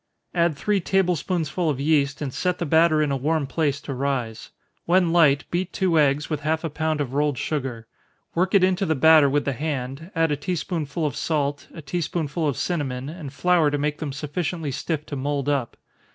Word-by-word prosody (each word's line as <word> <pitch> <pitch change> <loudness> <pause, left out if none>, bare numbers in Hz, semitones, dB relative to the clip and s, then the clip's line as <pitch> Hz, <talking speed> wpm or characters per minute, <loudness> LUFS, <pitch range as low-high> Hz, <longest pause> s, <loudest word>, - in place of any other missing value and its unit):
Add 170 -4 +1
three 205 +5 +1
table 185 0 +2
spoonsful 165 0 -1
of 140 -3 -1
yeast, 145 -1 +1
and 135 -3 -4
set 180 -1 -1
the 170 - -2
batter 160 0 +4
in 145 - -1
a - - +1
warm 150 +3 0
place 140 0 -1
to 140 - -5
rise. 130 -4 -3 0.4
When 175 -1 +3
light, 150 -4 +5
beat 180 +1 -1
two 175 -4 +2
eggs, 145 0 +2
with 155 -3 -2
half 160 +2 -1
a 165 - -3
pound 155 0 -1
of 130 -3 -4
rolled 145 -1 +1
sugar 130 -6 -3 0.5
work 185 +3 +1
it 195 - +5
into 190 +1 +2
the 160 - +2
batter 155 0 +6
with 145 +1 0
the 140 - 0
hand, 140 +2 -4
add 165 -1 +2
a - - +2
tea 145 +6 -3
spoonful 160 -1 -3
of 145 - -2
salt, 145 -3 -1
a 165 - -10
tea 160 +5 -2
spoonful 160 0 -2
of 140 - -1
cinnamon, 135 -6 -2
and 155 -4 -7
flour 170 +1 +3
to 145 - -1
make 150 +1 -2
them 150 -3 -3
sufficiently 150 +2 -3
stiff 150 +3 -3
to 145 - -6
mould 140 0 -2
up. 140 -5 -1
150 Hz, 210 wpm, -24 LUFS, 140-170 Hz, 0.5 s, batter